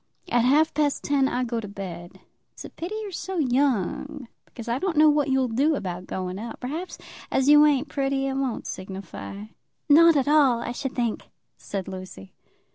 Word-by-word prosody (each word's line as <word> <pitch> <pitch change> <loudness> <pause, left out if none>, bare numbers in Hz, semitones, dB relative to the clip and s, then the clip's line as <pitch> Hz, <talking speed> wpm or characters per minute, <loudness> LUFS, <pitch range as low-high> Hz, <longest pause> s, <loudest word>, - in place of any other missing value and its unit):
At 240 -1 +3
half 300 +5 +4
past 290 -1 0
ten 275 -2 +2
I 250 -1 -1
go 235 -1 -2
to 215 - -6
bed. 180 -4 -8 0.3
It's - - -10
a - - -10
pity 355 +6 -6
you're 410 - -6
so 375 +1 -5
young, 275 - 0 0.2
because 235 -1 -11
I 235 +2 0
don't 365 -1 -2
know 305 0 +7
what 295 -1 +1
you'll 265 -1 +2
do 275 +7 +2
about 185 -6 -5
going 185 0 -4
out. 230 +2 -7
Perhaps, 315 +9 -5 0.3
as 265 0 +1
you 295 0 +8
ain't 290 0 +1
pretty, 270 -1 -1
it 270 - -1
won't 265 -4 -2
signify." 195 +1 -7 0.4
"Not 330 +2 +7
at 275 -2 +1
all, 285 -5 +4
I 235 - -4
should 260 +2 -5
think," 235 -3 -2 0.3
said 195 -2 -6
Lucy. 185 - -9
265 Hz, 190 wpm, -25 LUFS, 215-295 Hz, 0.4 s, you